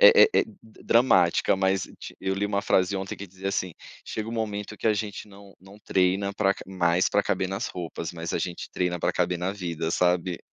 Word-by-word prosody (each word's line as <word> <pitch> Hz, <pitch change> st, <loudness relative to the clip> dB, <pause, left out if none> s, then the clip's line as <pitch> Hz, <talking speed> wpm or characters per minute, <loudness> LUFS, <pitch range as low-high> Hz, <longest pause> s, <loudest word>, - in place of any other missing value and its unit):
eh 475 Hz, -3 st, +9 dB
eh, -, -, +4 dB
d 190 Hz, -, -18 dB
dramática, 95 Hz, -7 st, +4 dB
mas 95 Hz, 0 st, +1 dB, 0.2 s
ti -, -, -9 dB
eu 95 Hz, 0 st, -1 dB
li 100 Hz, +1 st, -1 dB
uma 100 Hz, -1 st, -1 dB
frase 95 Hz, +1 st, +2 dB
ontem 95 Hz, 0 st, -4 dB
que 100 Hz, -, -7 dB
dizia 95 Hz, +2 st, -5 dB
assim: 95 Hz, -2 st, -1 dB, 0.3 s
"Chega 110 Hz, 0 st, -4 dB
um -, -, -5 dB
momento 105 Hz, -2 st, -3 dB
que -, -, -3 dB
a 110 Hz, -, +5 dB
gente 105 Hz, 0 st, -4 dB
não 100 Hz, 0 st, -15 dB
não 95 Hz, +2 st, -15 dB
treina 95 Hz, 0 st, +1 dB
pra 100 Hz, -2 st, +2 dB
ca -, -, -10 dB
mais 90 Hz, -1 st, +2 dB
pra 100 Hz, -, +2 dB
caber 95 Hz, -2 st, 0 dB
nas 95 Hz, +4 st, -3 dB
roupas, 85 Hz, -1 st, -5 dB
mas 85 Hz, 0 st, -5 dB
a -, -, 0 dB
gente 90 Hz, -1 st, -4 dB
treina 90 Hz, -1 st, -1 dB
pra -, -, 0 dB
caber 90 Hz, 0 st, 0 dB
na 90 Hz, +2 st, -1 dB
vida", 85 Hz, -5 st, -3 dB
sabe. 90 Hz, 0 st, +1 dB
95 Hz, 220 wpm, -26 LUFS, 90-105 Hz, 0.3 s, eh